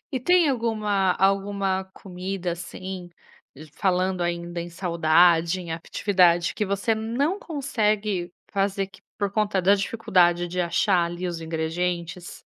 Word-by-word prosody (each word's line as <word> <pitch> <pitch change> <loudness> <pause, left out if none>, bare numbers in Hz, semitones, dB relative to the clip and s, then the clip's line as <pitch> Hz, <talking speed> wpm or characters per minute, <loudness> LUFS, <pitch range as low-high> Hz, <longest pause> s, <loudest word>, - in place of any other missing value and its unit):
E 260 - -1
tem 355 +3 +4
alguma 215 -6 +1
alguma 195 0 +1
comida, 185 -1 -4
assim, 180 +1 -7 0.6
falando 185 -1 0
ainda 175 0 -3
em 170 +1 -6
saudade, 170 0 +3
em 170 -2 -6
atividade, 175 +1 +2
que 210 - -1
você 200 +3 0
não 240 - -1
consegue 215 - -1 0.2
fazer 195 0 0
que 195 +2 -18 0.2
por 200 -1 0
conta 210 -2 +1
da 195 +3 +5
dificuldade 180 -4 +2
de 180 +1 -2
achar 175 +1 +2
ali 175 +2 -4
os 170 -2 -4
ingredientes? 170 +2 -3
185 Hz, 130 wpm, -25 LUFS, 175-205 Hz, 0.6 s, da